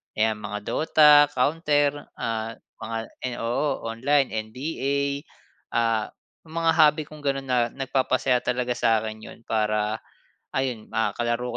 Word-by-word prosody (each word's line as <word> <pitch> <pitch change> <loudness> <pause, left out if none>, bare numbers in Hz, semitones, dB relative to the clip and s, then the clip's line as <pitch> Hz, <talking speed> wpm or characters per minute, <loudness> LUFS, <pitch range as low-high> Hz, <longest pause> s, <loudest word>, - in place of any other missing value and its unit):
'yan 110 0 +1
mga 105 0 -5
Dota, 150 -2 +6
Counter, 145 +1 +1
ah, 115 0 -3 0.3
mga 115 0 -3 0.5
oo, 135 +4 -1
online, 135 +5 +1 0.2
NBA, 140 +2 -2 0.8
ah, 115 -2 +2 0.4
mga 165 0 +1
hobby 150 0 +5
kong 150 -1 -12
ganon 135 -1 -1
na 125 -2 +2
nagpapasaya 130 -1 +1
talaga 125 0 -1
sa'kin 110 -1 +1
yun - - -11
para, 105 0 0 0.5
ayun, 125 -5 -2
ah, 110 -2 +1
kalaro 120 +1 -1
125 Hz, 120 wpm, -25 LUFS, 115-145 Hz, 0.8 s, Dota